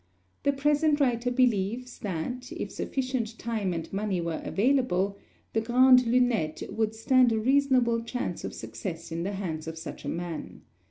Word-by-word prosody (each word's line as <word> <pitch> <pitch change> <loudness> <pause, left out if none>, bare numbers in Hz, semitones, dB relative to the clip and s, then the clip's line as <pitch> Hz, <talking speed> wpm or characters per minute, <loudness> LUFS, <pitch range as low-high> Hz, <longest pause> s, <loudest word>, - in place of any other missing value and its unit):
The 280 - +3
present 295 +2 +2
writer 245 -3 +2
believes 245 -1 0
that, 215 +7 -4
if - - -5
sufficient 255 -4 -2
time 220 -5 -2
and 165 +1 -5
money 200 -2 -1
were 170 -1 -3
available, 200 -5 +1 0.4
the 220 - +2
Grande 250 +2 +6
Lunette 235 -10 +1
would 220 -1 -1
stand 250 +2 +4
a 220 - +1
reasonable 255 -2 +3
chance 240 +2 -4
of - - -5
success 170 -4 -6
in 165 +1 -2
the 195 +4 -2
hands 165 -5 -4
of 160 0 -5
such 165 - -8
a - - -3
man. 170 -2 -5
230 Hz, 160 wpm, -28 LUFS, 190-255 Hz, 0.4 s, Grande